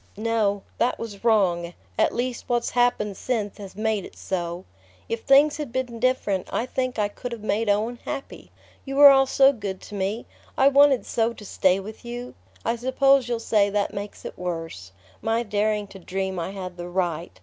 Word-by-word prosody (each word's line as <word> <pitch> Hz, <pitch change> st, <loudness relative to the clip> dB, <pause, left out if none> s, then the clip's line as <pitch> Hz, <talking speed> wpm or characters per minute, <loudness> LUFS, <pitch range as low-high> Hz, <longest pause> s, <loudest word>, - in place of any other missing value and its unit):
"No; 215 Hz, -2 st, 0 dB, 0.2 s
that 245 Hz, -, +1 dB
was 210 Hz, -3 st, -8 dB
wrong. 180 Hz, -7 st, +2 dB, 0.2 s
At -, -, +3 dB
least 245 Hz, +1 st, -3 dB
what's 240 Hz, -1 st, 0 dB
happened 245 Hz, -4 st, +1 dB
since 220 Hz, -5 st, -2 dB
has 195 Hz, -2 st, -9 dB
made 215 Hz, -1 st, 0 dB
it -, -, -12 dB
so. 175 Hz, -1 st, -4 dB, 0.4 s
If 230 Hz, 0 st, -3 dB
things 285 Hz, +2 st, +5 dB
had 295 Hz, -5 st, -5 dB
been 250 Hz, -2 st, -3 dB
different 220 Hz, -6 st, 0 dB
I 235 Hz, -, 0 dB
think 255 Hz, -1 st, -2 dB
I 210 Hz, -1 st, +2 dB
could 245 Hz, +4 st, -7 dB
have 230 Hz, -3 st, -7 dB
made 215 Hz, +1 st, 0 dB
Owen 220 Hz, +4 st, 0 dB
happy. 275 Hz, -, -6 dB, 0.3 s
You 270 Hz, -1 st, -5 dB
were 285 Hz, 0 st, +10 dB
all 270 Hz, 0 st, +5 dB
so 270 Hz, +1 st, +5 dB
good 200 Hz, -6 st, -5 dB
to -, -, -12 dB
me 200 Hz, +3 st, -2 dB, 0.3 s
I 270 Hz, +1 st, +6 dB
wanted 280 Hz, -2 st, +5 dB
so 230 Hz, 0 st, 0 dB
to 215 Hz, -, -12 dB
stay 190 Hz, -1 st, +2 dB
with 215 Hz, +5 st, -9 dB
you! 240 Hz, +1 st, -6 dB, 0.3 s
I 235 Hz, -, 0 dB
suppose 260 Hz, +1 st, +3 dB
you'll 235 Hz, -1 st, -1 dB
say 210 Hz, -3 st, +2 dB
that 200 Hz, 0 st, -1 dB
makes 205 Hz, +1 st, -7 dB
it -, -, -8 dB
worse: 165 Hz, -, -5 dB, 0.3 s
my 225 Hz, +2 st, 0 dB
daring 210 Hz, -1 st, 0 dB
to 195 Hz, -, -11 dB
dream 190 Hz, +1 st, -3 dB
I 170 Hz, -, -3 dB
had 185 Hz, -2 st, -7 dB
the 175 Hz, 0 st, -6 dB
right... 175 Hz, -2 st, -2 dB
215 Hz, 195 wpm, -24 LUFS, 195-245 Hz, 0.4 s, were